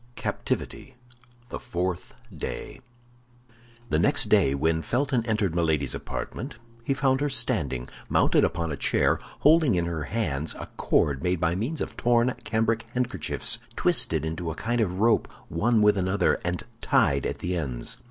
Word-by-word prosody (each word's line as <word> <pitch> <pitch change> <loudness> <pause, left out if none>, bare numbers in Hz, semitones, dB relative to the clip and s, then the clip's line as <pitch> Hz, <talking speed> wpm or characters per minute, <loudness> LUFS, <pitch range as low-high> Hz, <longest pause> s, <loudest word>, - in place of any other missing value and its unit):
CAPTIVITY: - - -4 0.5
THE - - -5
FOURTH 90 -6 -3 0.2
DAY - - -6 1.1
The 75 - +3
next - - +3
day, 70 - +4
when 80 +3 +1
Felton 130 - 0
entered 105 -6 0
Milady's 80 -5 +1
apartment 130 +4 -5 0.3
he 135 +3 0
found 135 0 +1
her 145 - +1
standing, 70 - 0 0.2
mounted - - +3
upon 85 -1 -1
a - - -2
chair, - - +1 0.2
holding 155 - +5
in 85 -1 +1
her 85 -3 -3
hands 80 -10 -1
a - - -7
cord 70 -3 +1
made 90 0 0
by 85 -1 +1
means 120 - -3
of - - -4
torn 120 +1 +2
cambric 115 0 0
handkerchiefs, 120 -10 0 0.2
twisted - - +3
into 80 +1 -3
a 80 - -4
kind 120 +5 -1
of 95 -3 -1
rope 115 0 +3 0.2
one 110 +6 +2
with 105 0 +5
another, 95 +2 +1
and 90 0 -2 0.2
tied 70 -1 +2
at - - -2
the 90 +1 -3
ends. 65 - -4
90 Hz, 155 wpm, -26 LUFS, 80-120 Hz, 1.1 s, holding